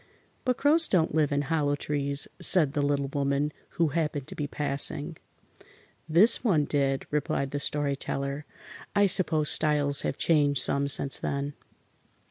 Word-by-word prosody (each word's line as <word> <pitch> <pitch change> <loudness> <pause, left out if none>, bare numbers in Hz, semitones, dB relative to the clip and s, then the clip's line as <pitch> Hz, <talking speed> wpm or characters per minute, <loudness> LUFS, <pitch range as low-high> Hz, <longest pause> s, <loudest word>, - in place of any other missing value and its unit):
"But 250 -1 0
crows 315 +3 +2
don't 165 -5 0
live 150 -2 +1
in 145 0 0
hollow 145 -1 -1
trees," 140 -1 -3
said 155 -7 +3
the 145 - -1
Little 140 -1 -1
Woman, 140 +1 -2 0.2
who 165 -2 +2
happened 150 -3 -3
to - - -7
be 145 - -4
passing. 145 +2 -2 0.9
"This 205 +11 +6
one 165 - +1
did," 135 -2 -1
replied 140 -2 -2
the 145 - -3
Story 145 -1 -2
Teller. 140 +1 -5 0.5
"I 205 0 +4
suppose 165 -5 +2
styles 145 -2 +2
have - - -4
changed 145 -4 +1
some 140 0 +4
since 140 0 +1
then." 140 +1 -4
145 Hz, 150 wpm, -26 LUFS, 140-160 Hz, 0.9 s, This